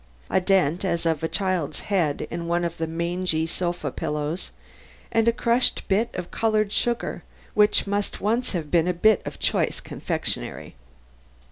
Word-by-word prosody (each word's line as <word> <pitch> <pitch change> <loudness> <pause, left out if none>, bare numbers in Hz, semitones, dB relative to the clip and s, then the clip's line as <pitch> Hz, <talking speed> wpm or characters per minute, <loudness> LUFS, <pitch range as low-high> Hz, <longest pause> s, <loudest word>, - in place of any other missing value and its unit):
A 190 - +3
dent 180 -3 +2
as 170 -3 0
of 160 -3 +1
a 160 - 0
child's 180 -6 -1
head 175 -8 0
in 170 0 -4
one 175 0 +1
of 170 0 -4
the 160 - -1
mangy 170 0 -1
sofa 175 -3 -2
pillows 150 +6 -3 0.6
and 225 0 +2
a - - +7
crushed 235 +1 +1
bit 215 +4 +2
of 180 -1 -5
colored 215 -2 +1
sugar 240 -1 0 0.3
which 210 0 +4
must 205 0 -2
once 230 +4 0
have 160 -5 -3
been 170 -1 +3
a 180 - +1
bit 215 +3 +4
of - - -6
choice - - +1
confectionery. - - -3
180 Hz, 160 wpm, -25 LUFS, 165-210 Hz, 0.6 s, a